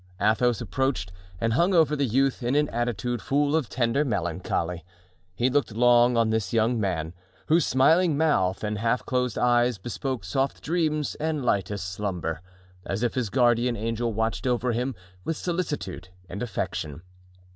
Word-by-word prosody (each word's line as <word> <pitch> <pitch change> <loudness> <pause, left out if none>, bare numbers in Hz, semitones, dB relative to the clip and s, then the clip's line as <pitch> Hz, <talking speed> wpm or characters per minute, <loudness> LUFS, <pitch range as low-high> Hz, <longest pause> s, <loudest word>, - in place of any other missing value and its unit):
Athos 110 +3 +2
approached 115 -4 -1 0.3
and 115 0 0
hung 175 +9 +3
over 155 -3 +4
the 140 -2 0
youth 135 +4 +1
in 120 +3 0
an 150 0 +3
attitude 120 0 -2
full 145 +6 +1
of 150 -9 0
tender 120 +5 +1
melancholy; 90 - -2 0.5
he 120 - +2
looked 130 -4 0
long 120 0 +5
on 115 -1 +3
this 110 -2 -1
young 115 +1 +2
man, 85 -5 -2 0.4
whose 165 0 +4
smiling 160 +4 +4
mouth 105 -14 +1
and 105 -1 -2
half 115 +3 0
closed 125 -1 -1
eyes 120 -1 +3
bespoke 120 +3 -4
soft 135 +8 -1
dreams 155 -3 0
and 155 -3 -1
lightest 100 -3 0
slumber, 90 -4 -3 0.4
as 100 +4 -3
if 120 - +1
his 125 -5 -1
guardian 120 +2 +2
angel 115 +2 -2
watched 110 -1 -1
over 125 0 +1
him 125 +2 -2 0.3
with 165 - -2
solicitude 160 - -3 0.2
and 100 - -6
affection. 85 -8 -4
120 Hz, 155 wpm, -26 LUFS, 105-135 Hz, 0.5 s, long